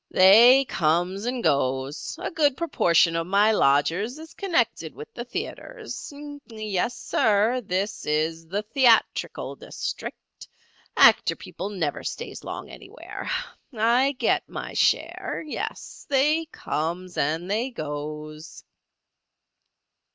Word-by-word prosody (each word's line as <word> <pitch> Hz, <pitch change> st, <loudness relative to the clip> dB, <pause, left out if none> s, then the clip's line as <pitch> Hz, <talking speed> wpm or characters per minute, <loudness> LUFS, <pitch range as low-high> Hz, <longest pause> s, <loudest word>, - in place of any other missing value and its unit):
"They 235 Hz, +8 st, +7 dB
comes 175 Hz, +3 st, 0 dB
and 245 Hz, -1 st, -2 dB
goes. 135 Hz, +1 st, -1 dB
A -, -, -4 dB
good 290 Hz, -5 st, +2 dB
proportion 170 Hz, -, +3 dB
of 165 Hz, 0 st, -1 dB
my 200 Hz, +3 st, +4 dB
lodgers 175 Hz, -, +2 dB
is 320 Hz, 0 st, -11 dB
connected 240 Hz, -, -1 dB
with 150 Hz, -, -10 dB
the 240 Hz, -, -5 dB
theatres. 420 Hz, -, -7 dB, 0.4 s
Yes, 215 Hz, 0 st, -2 dB
sir, 220 Hz, +4 st, +2 dB
this 195 Hz, +2 st, -3 dB
is 160 Hz, +2 st, -1 dB
the 200 Hz, +5 st, -2 dB
theatrical 235 Hz, 0 st, +2 dB
district. -, -, -7 dB, 0.5 s
Actor -, -, +6 dB
people 195 Hz, -, -7 dB
never 170 Hz, -8 st, -3 dB
stays -, -, -6 dB
long -, -, -6 dB
anywhere. -, -, -9 dB, 0.5 s
I 240 Hz, +5 st, +3 dB
get 250 Hz, -, 0 dB
my -, -, -6 dB
share. -, -, 0 dB
Yes, 300 Hz, -, -6 dB
they 300 Hz, +4 st, +2 dB
comes 175 Hz, -, -4 dB
and 160 Hz, +6 st, -1 dB
they 230 Hz, +5 st, 0 dB
goes." 155 Hz, -, -7 dB
200 Hz, 115 wpm, -25 LUFS, 160-245 Hz, 0.5 s, They